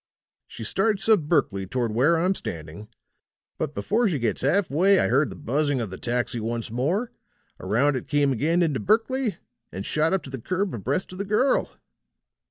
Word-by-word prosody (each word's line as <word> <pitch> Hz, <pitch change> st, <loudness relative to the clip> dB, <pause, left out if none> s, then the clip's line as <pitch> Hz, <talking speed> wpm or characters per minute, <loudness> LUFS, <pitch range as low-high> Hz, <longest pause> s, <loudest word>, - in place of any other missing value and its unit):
She -, -, -9 dB
starts 215 Hz, -3 st, 0 dB
up 220 Hz, -3 st, +6 dB
Berkley 125 Hz, -, 0 dB
toward 120 Hz, +2 st, -1 dB
where 135 Hz, +10 st, +3 dB
I'm 180 Hz, +4 st, +2 dB
standing, 85 Hz, -, -7 dB, 0.7 s
but 150 Hz, -2 st, -3 dB
before 230 Hz, +3 st, +1 dB
she 170 Hz, -7 st, 0 dB
gets 115 Hz, -4 st, -1 dB
half 175 Hz, +8 st, +2 dB
way 185 Hz, +7 st, +4 dB
I -, -, +2 dB
heard 135 Hz, +5 st, +3 dB
the -, -, -8 dB
buzzing 145 Hz, 0 st, 0 dB
of 110 Hz, -5 st, -4 dB
the 95 Hz, -, -7 dB
taxi 120 Hz, 0 st, -2 dB
once 115 Hz, 0 st, -3 dB
more; 165 Hz, -, -1 dB, 0.5 s
around 125 Hz, +9 st, +2 dB
it 130 Hz, -, -4 dB
came 145 Hz, 0 st, +2 dB
again 165 Hz, +8 st, +1 dB
into 150 Hz, -6 st, 0 dB
Berkley 225 Hz, 0 st, +1 dB, 0.3 s
and 95 Hz, +1 st, -6 dB
shot 155 Hz, +1 st, +1 dB
up 190 Hz, -5 st, 0 dB
to 135 Hz, -, -10 dB
the 130 Hz, -3 st, -6 dB
curb 185 Hz, -, -1 dB
abreast 135 Hz, -, -2 dB
of 185 Hz, -, -9 dB
the -, -, 0 dB
girl. 215 Hz, +7 st, +2 dB
145 Hz, 185 wpm, -25 LUFS, 120-190 Hz, 0.7 s, up